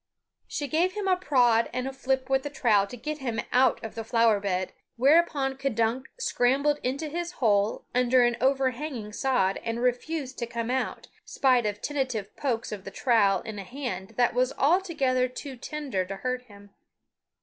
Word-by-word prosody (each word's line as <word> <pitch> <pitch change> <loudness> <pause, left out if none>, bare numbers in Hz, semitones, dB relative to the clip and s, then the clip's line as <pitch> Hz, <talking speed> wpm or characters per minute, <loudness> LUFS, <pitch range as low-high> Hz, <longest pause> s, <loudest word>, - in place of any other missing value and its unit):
She 290 - -3
gave 340 +5 +1
him 415 -1 -3
a 370 - +4
prod 245 -10 +3
and 255 +1 -2
a 270 - -5
flip 265 0 -1
with 270 0 +2
the 290 - -5
trowel 215 -8 +2
to 245 - -9
get 305 +5 -5
him 235 -4 -3
out 255 0 +3
of 225 - -6
the 225 - -5
flower 230 -2 +3
bed, 185 -2 -2 0.2
whereupon 275 0 +3
K'dunk 245 -1 0
scrambled 290 - +1
into 275 +5 -2
his 345 +3 -4
hole 210 - +1
under 250 0 +4
an 240 0 +2
overhanging 260 -3 0
sod 245 -7 +1
and 230 0 -2
refused 255 +3 -2
to 235 - -2
come 235 0 -3
out, 260 0 -2 0.2
spite 255 -5 +2
of 210 0 -4
tentative 260 -8 -2
pokes 240 -5 -2
of 205 -3 -6
the - - -7
trowel 205 -7 +2
in 215 -2 -6
a - - -5
hand 235 -3 -6
that 245 -1 +3
was 250 +2 +2
altogether 280 -6 +2
too 260 +2 -8
tender 270 -7 -3
to 195 +2 -6
hurt 250 +5 -3
him. 205 -3 -16
255 Hz, 180 wpm, -27 LUFS, 225-275 Hz, 0.2 s, a